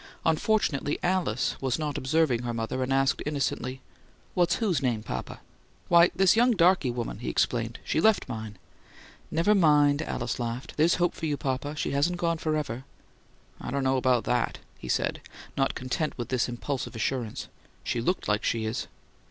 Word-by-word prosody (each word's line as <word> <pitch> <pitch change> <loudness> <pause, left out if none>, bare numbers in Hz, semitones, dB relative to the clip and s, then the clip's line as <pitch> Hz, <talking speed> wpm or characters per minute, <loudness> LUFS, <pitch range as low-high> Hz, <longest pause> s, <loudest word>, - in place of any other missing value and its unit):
Unfortunately 155 -5 +1
Alice 175 -9 0
was 130 -2 0
not 150 -3 -3
observing 130 -3 +1
her 120 -1 -3
mother, 115 +3 -2
and 130 +1 -1
asked, 135 0 +2
innocently: 135 -3 -2 0.5
"What's 175 -1 +2
whose 190 - 0
name, 120 -5 0
papa?" 65 - -6 0.5
"Why, 170 0 +7
this 190 +1 +5
young 240 +2 +4
darky 180 - +4
woman," 120 -1 -4
he - - -4
explained. - - 0
"She 155 - 0
left 220 +1 +3
mine." 110 -4 -6 0.7
"Never 170 +6 +3
mind," 150 -5 +4
Alice 120 -7 -3
laughed. 120 +2 -4
"There's 160 +3 +4
hope 175 -1 +1
for 160 - -4
you, 145 -1 -1
papa. 140 +3 -2
She - - -2
hasn't 150 +6 +1
gone 170 -2 0
forever!" 150 -6 -2 0.8
"I - - -6
don't 140 +1 -1
know 130 0 +2
about 125 -3 +2
that," 125 - 0 0.2
he 65 - -9
said, - - 0 0.3
not 135 0 +1
content 130 +5 -2
with 120 - -4
this 130 -1 +1
impulsive 125 +1 -4
assurance. 115 0 -2 0.4
"She 120 - -1
LOOKED 180 +9 -1
like 105 0 +1
she 115 -1 0
is." 110 +3 -3
140 Hz, 170 wpm, -27 LUFS, 125-165 Hz, 0.8 s, Why